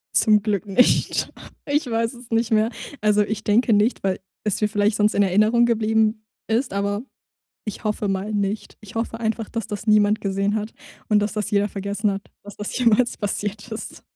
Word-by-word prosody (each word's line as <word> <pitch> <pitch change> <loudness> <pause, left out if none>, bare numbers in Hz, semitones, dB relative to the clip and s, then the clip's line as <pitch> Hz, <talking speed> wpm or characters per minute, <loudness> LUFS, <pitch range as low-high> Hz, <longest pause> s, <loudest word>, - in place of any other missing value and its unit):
Zum 215 -2 +5
Glück 205 -1 -1
nicht. 205 +5 +2 0.4
Ich 295 +1 0
weiß 230 0 0
es 240 -1 -13
nicht 225 0 +1
mehr. 220 0 +3 0.3
Also, 210 0 +3
ich 215 +1 -4
denke 225 +2 +3
nicht, 210 +4 +2
weil 190 -1 -1 0.3
es 210 -1 0
mir 210 - +2
vielleicht 205 0 +1
sonst 210 0 +2
in 205 - +3
Erinnerung 215 +5 +4
geblieben 220 -1 +1 0.2
ist, 235 +4 0
aber 200 +1 -1 0.6
ich 210 - -6
hoffe 210 -1 -1
mal 195 +2 -2
nicht. 205 0 -2
Ich 210 +2 -13
hoffe 225 0 -3
einfach, 225 -1 -2
dass 230 -2 -4
das 210 +1 -6
niemand 210 0 +4
gesehen 200 +1 0
hat 215 0 -3 0.4
und 210 - +4
dass 210 0 0
das 210 -2 -2
jeder 205 0 +2
vergessen 200 +1 -1
hat, 195 0 -5 0.2
dass 205 0 -11
das 210 +3 -4
jemals 240 0 +3
passiert 205 +1 -3
ist. 220 - -7
210 Hz, 190 wpm, -22 LUFS, 205-225 Hz, 0.6 s, Zum